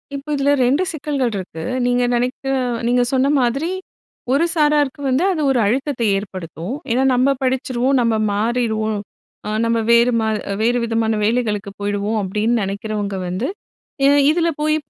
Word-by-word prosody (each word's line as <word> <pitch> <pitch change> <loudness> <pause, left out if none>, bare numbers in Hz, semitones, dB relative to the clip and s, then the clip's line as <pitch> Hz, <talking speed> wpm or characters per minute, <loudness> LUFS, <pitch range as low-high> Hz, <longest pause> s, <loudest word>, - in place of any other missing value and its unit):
இப்போ 280 +2 -7
இதில 280 +1 +2
2 285 +9 +2
சிக்கல்கள் 285 -6 -2
இருக்கு. 165 -3 -7 0.2
நீங்க 245 0 +2
நினைக்கிற 255 +3 -1 0.3
நீங்க 245 0 +3
சொன்ன 265 +1 +3
மாதிரி 275 +8 0 0.6
ஒரு 290 +5 +3
சாராருக்கு 295 -2 +2
வந்து, 265 +7 +2
அது 310 - -2
ஒரு 250 - +2
அழுத்தத்த 265 +3 -1 0.2
ஏற்படுத்தும். 185 - -6 0.2
ஏன்னா, 255 +3 +2
"நம்ம 255 +2 +3
படிச்சுருவோம், 255 0 0
நம்ம 230 -1 +2 0.2
மாறிருவோம் 220 -1 0 0.5
அ 210 - -2
நம்ம 230 0 +1
வேறு 235 +1 +5
மா 220 - 0 0.3
வேறு 240 +2 +2
விதமான 225 -1 0
வேலைகளுக்கு 210 -3 0
போயிடுவோம்" 205 +2 -1
அப்படின்னு 210 +5 0
நினைக்கிறவங்க 200 0 -3
வந்து 185 +9 -2 0.6
ஏன்னா 280 +1 +5
இதில 335 +1 +1
போய் 305 +1 +2
245 Hz, 145 wpm, -19 LUFS, 215-275 Hz, 0.6 s, வேறு